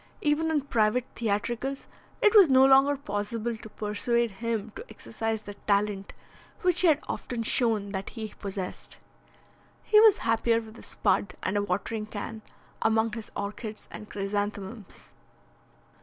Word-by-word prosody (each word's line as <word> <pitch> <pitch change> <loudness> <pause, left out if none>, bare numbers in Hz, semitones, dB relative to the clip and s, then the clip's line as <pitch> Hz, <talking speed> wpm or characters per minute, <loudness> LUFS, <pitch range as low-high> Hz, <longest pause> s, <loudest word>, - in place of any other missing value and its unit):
Even 300 +2 +1
in 310 -2 +1
private 235 -2 +1
theatricals 240 +5 -2 0.4
it 420 - +6
was 400 -7 +8
no 265 0 +7
longer 270 +1 +5
possible 225 -1 -3
to 220 0 -11
persuade 220 +3 0
him 225 +1 -3
to - - -7
exercise 225 -1 -4
the 205 - -8
talent 200 -1 0 0.5
which 360 -1 +4
he 365 - +5
had 305 -3 +5
often 235 -2 -4
shown 220 -4 +1
that 195 -1 -4
he 220 -3 -7
possessed. 195 -2 -5 0.9
He 425 - +5
was 435 -2 +7
happier 230 0 +2
with 225 0 -11
a - - -11
spud 200 -1 0
and 190 - -1
a 205 - +2
watering 205 +3 -2
can 220 +1 -6 0.4
among 220 0 +2
his 220 -1 -6
orchids 210 +1 -6
and 210 - -9
chrysanthemums. 205 +1 -5
220 Hz, 145 wpm, -27 LUFS, 205-245 Hz, 0.9 s, was